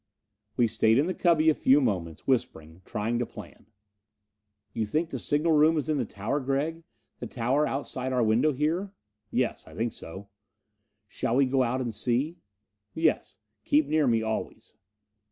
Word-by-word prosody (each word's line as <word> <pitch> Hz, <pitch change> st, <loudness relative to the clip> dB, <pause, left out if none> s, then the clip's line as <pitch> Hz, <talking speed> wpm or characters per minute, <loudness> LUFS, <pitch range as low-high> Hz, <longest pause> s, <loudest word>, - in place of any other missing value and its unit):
We 120 Hz, -2 st, +4 dB
stayed 110 Hz, +1 st, +3 dB
in 140 Hz, -, +3 dB
the 185 Hz, -, -1 dB
cubby 160 Hz, -3 st, +3 dB
a -, -, +1 dB
few 140 Hz, 0 st, +4 dB
moments, 90 Hz, -, -2 dB
whispering 85 Hz, -, -2 dB
trying 115 Hz, +3 st, -2 dB
to 120 Hz, -, 0 dB
plan. -, -, -12 dB, 1.1 s
"You 115 Hz, -, -1 dB
think 155 Hz, +10 st, -1 dB
the -, -, -4 dB
signal 150 Hz, +3 st, +1 dB
room 155 Hz, +1 st, +4 dB
is 150 Hz, -, -2 dB
in 150 Hz, -2 st, +1 dB
the 125 Hz, -, 0 dB
tower, 105 Hz, +7 st, -3 dB
Gregg? 140 Hz, +5 st, -2 dB, 0.4 s
This 120 Hz, -, -8 dB
tower 130 Hz, +5 st, +1 dB
outside 130 Hz, -1 st, -3 dB
our 125 Hz, -2 st, +2 dB
window 115 Hz, +8 st, +3 dB
here?" 165 Hz, +8 st, -1 dB, 0.4 s
"Yes, -, -, -1 dB
I -, -, -13 dB
think 115 Hz, 0 st, -2 dB
so." 95 Hz, +4 st, -9 dB, 0.8 s
"Shall 115 Hz, -, -2 dB
we 140 Hz, +1 st, +4 dB
go 130 Hz, +1 st, +1 dB
out 130 Hz, +1 st, 0 dB
and 120 Hz, -3 st, -3 dB
see?" 130 Hz, -, -1 dB, 0.6 s
"Yes. -, -, 0 dB, 0.3 s
Keep 150 Hz, +1 st, +3 dB
near 155 Hz, -2 st, +2 dB
me 115 Hz, -2 st, +2 dB
always." 110 Hz, 0 st, -5 dB
130 Hz, 170 wpm, -27 LUFS, 115-150 Hz, 1.1 s, We